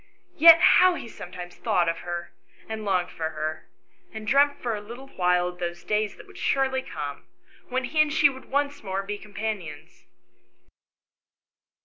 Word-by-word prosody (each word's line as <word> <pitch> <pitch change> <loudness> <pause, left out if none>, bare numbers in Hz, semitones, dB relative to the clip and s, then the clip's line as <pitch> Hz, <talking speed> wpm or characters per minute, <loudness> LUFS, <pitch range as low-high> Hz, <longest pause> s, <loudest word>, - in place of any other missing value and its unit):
Yet 330 +1 +9 0.2
how 365 -1 +5
he 235 - -7
sometimes 180 -4 -9
thought 175 -1 +1
of 165 0 -1
her, 175 0 -6 0.3
and 220 -1 -5
longed 185 -3 0
for 160 -1 -3
her, 155 0 -5 0.4
and 220 -1 -8
dreamt 285 +4 +3
for 235 -3 -2
a 205 - -6
little 240 +6 -10
while 180 -3 +1
of 180 0 -12
those 175 -1 -4
days 210 -1 -1
that - - -14
would - - -14
surely 265 -1 +1
come, 145 - -7 0.4
when 255 0 -1
he 305 +5 +2
and 305 -1 +2
she 305 -1 +5
would 260 -2 -7
once 285 +1 -1
more 195 -1 -3
be 205 +1 -5
companions 200 -7 -6
210 Hz, 165 wpm, -25 LUFS, 175-265 Hz, 0.4 s, Yet